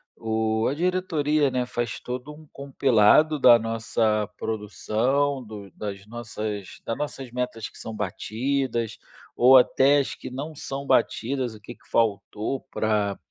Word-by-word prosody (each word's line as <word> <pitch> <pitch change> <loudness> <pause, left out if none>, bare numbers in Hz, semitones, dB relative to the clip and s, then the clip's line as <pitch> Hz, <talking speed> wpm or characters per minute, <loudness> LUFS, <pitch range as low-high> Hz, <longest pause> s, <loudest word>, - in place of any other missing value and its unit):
o 110 0 0
a 140 - -2
diretoria, 155 -4 +1
né, 125 -1 -1
faz 120 -3 -3
todo 125 +4 -6
um 155 +1 -14
compilado 140 +2 +3
da 120 -2 +8
nossa 110 -1 0
produção, 125 +6 -1
do 105 -3 -10
das 100 -1 -7
nossas 110 -3 -5 0.2
das 115 - -2
nossas 135 -4 -5
metas 125 -3 -3
que - - -16
são 110 -1 -7
batidas 115 +4 -2 0.4
ou 130 +2 +7
até 135 +2 +5
as 140 - 0
que - - -8
não 145 +5 -6
são 140 -1 -6
batidas, 125 -1 0
o - - -13
que 120 +3 -10
que - - -26
faltou 110 +3 0
pra 105 -2 0
120 Hz, 145 wpm, -25 LUFS, 110-140 Hz, 0.4 s, da